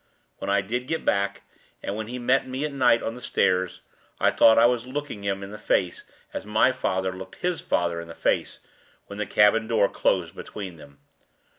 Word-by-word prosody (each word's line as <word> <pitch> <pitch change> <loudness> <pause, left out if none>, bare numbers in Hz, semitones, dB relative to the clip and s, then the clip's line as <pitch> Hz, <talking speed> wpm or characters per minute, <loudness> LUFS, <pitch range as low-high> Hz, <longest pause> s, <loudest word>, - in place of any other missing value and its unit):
When - - -4
I 100 0 +3
did 120 +6 -3
get 160 +2 -2
back, 100 0 0 0.4
and 100 - -3
when 110 0 -4
he 125 +2 -5
met 125 +2 +2
me 130 +3 -3
at 150 - -4
night 125 -4 +3
on 115 - -2
the 125 - -10
stairs, 90 -5 +1 0.4
I - - +4
thought 110 - +6
I 115 - +7
was 120 0 +1
looking 145 -5 -5
him 100 0 -2
in 100 - -8
the 105 - -8
face 90 -3 0 0.3
as - - -4
my 110 +4 +3
father 95 -6 -1
looked 95 +1 -9
his 180 -2 -2
father 85 -1 0
in 85 - -10
the 85 - -10
face - - 0 0.5
when 100 - -9
the 105 - -2
cabin 110 +2 +4
door 110 -3 +3
closed 85 -3 0
between 95 -5 -7
them. 70 -2 -15
105 Hz, 205 wpm, -25 LUFS, 95-125 Hz, 0.5 s, I